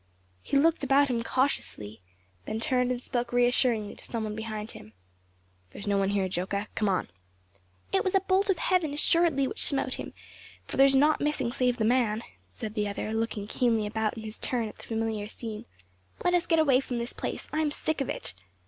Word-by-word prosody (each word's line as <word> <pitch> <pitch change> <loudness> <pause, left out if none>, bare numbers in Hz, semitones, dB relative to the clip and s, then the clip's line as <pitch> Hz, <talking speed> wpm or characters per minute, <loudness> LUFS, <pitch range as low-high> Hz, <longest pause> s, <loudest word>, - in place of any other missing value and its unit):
He 280 - 0
looked 325 +2 +3
about 275 +1 +4
him 235 -2 0
cautiously, 230 - -1 0.5
then 220 - -2
turned 250 +1 +1
and 250 -1 -1
spoke 245 -1 -3
reassuringly 245 -3 +2
to - - -12
some 230 -2 -3
one 215 -1 -4
behind 220 0 -5
him. 105 - -13 0.8
"There - - -11
is - - -6
no 200 -1 +2
one 195 0 +1
here, 200 -2 +1
Joca; 190 +3 -2
come 210 -2 0
on!" 185 -3 0 0.8
"It - - +3
was 375 - 0
a - - +6
bolt 385 +1 +2
from 390 - +3
heaven 330 -6 +1
assuredly 315 -2 +3
which - - -3
smote 270 -2 +1
him; - - -7 0.5
for - - -6
there 270 +1 +8
is 270 - +3
naught 295 +3 +4
missing 295 -5 0
save 250 -1 +1
the 220 - +1
man," 230 -2 +2 0.3
said 210 - -6
the 210 -2 -1
other, 205 +2 -3
looking 225 -2 -2
keenly 225 0 +1
about 220 +1 -1
in 220 - -6
his 215 0 -5
turn 240 -3 0
at - - -14
the - - -12
familiar 220 -2 -2
scene; 220 -2 -6 0.6
"Let 355 - +3
us 350 -1 +2
get 330 - +3
away 280 -5 +5
from 255 -2 -4
this 235 +1 -2
place; - - -5
I 310 - 0
am 310 -1 +2
sick 305 0 -2
of 270 - -2
it." - - 0
240 Hz, 210 wpm, -28 LUFS, 215-275 Hz, 0.8 s, there